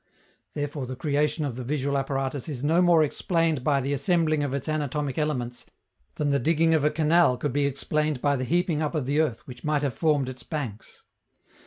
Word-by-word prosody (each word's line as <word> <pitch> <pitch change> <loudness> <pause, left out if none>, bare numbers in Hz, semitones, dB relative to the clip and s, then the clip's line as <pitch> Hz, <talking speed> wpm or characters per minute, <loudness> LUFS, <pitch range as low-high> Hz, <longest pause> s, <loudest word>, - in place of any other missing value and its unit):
Therefore 145 -2 -3
the 130 - -5
creation 150 +3 0
of 135 -5 -3
the 130 - -5
visual 140 +1 -1
apparatus 135 +1 -2
is 135 -3 -5
no 165 +4 +3
more 170 -3 +5
explained 160 -1 0
by 140 0 +2
the 135 +2 -1
assembling 155 +1 +1
of 145 -2 -1
its 140 +1 -3
anatomic 150 -2 -2
elements 125 -5 -2 0.5
than 145 -1 0
the 140 - +2
digging 165 +4 +2
of 155 -3 +2
a 150 - +4
canal 155 -3 +3
could 145 +4 -2
be 145 0 +2
explained 150 +1 -1
by 145 +2 +2
the 130 - -2
heaping 170 +2 +1
up 155 +1 -2
of 150 -5 -1
the 145 +3 +1
earth 145 -8 -2
which 125 -2 -11
might 150 -1 0
have 140 -3 0
formed 150 -1 +1
its 130 -1 -7
banks. 130 -10 -6
145 Hz, 205 wpm, -26 LUFS, 135-155 Hz, 0.5 s, more